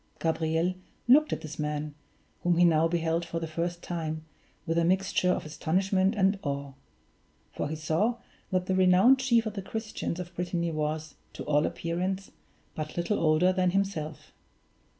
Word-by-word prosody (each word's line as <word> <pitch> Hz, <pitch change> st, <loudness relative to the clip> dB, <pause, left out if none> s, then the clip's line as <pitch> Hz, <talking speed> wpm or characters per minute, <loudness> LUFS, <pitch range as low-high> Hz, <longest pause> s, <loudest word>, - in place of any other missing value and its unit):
Gabriel 165 Hz, +2 st, 0 dB, 0.3 s
looked 295 Hz, +5 st, +6 dB
at -, -, -2 dB
this 155 Hz, 0 st, -8 dB
man, 150 Hz, 0 st, -2 dB, 0.5 s
whom 175 Hz, -1 st, +2 dB
he 175 Hz, -, +6 dB
now 165 Hz, -1 st, +4 dB
beheld 165 Hz, 0 st, 0 dB
for 165 Hz, -, -4 dB
the 165 Hz, -, -3 dB
first 170 Hz, +2 st, -3 dB
time, 160 Hz, -2 st, -4 dB, 0.4 s
with 165 Hz, 0 st, +1 dB
a -, -, +2 dB
mixture 185 Hz, +1 st, +2 dB
of 180 Hz, -, 0 dB
astonishment 190 Hz, +6 st, +1 dB
and 195 Hz, 0 st, +2 dB
awe; 140 Hz, -1 st, -3 dB, 0.8 s
for -, -, -2 dB
he 155 Hz, -, -3 dB
saw 160 Hz, +10 st, +1 dB, 0.3 s
that 185 Hz, -2 st, 0 dB
the 190 Hz, -, 0 dB
renowned 185 Hz, +8 st, +5 dB
chief 235 Hz, -3 st, +3 dB
of 215 Hz, -, -3 dB
the 200 Hz, -, -4 dB
Christians 215 Hz, -3 st, -4 dB
of 175 Hz, 0 st, -7 dB
Brittany 175 Hz, -1 st, -1 dB
was, 155 Hz, 0 st, -2 dB, 0.2 s
to -, -, -6 dB
all 150 Hz, +1 st, +2 dB
appearance, 185 Hz, +3 st, -3 dB, 0.4 s
but 155 Hz, +1 st, -6 dB
little 175 Hz, +5 st, 0 dB
older 165 Hz, +3 st, +4 dB
than 185 Hz, -1 st, +2 dB
himself. 175 Hz, -6 st, -2 dB
170 Hz, 165 wpm, -28 LUFS, 155-190 Hz, 0.8 s, looked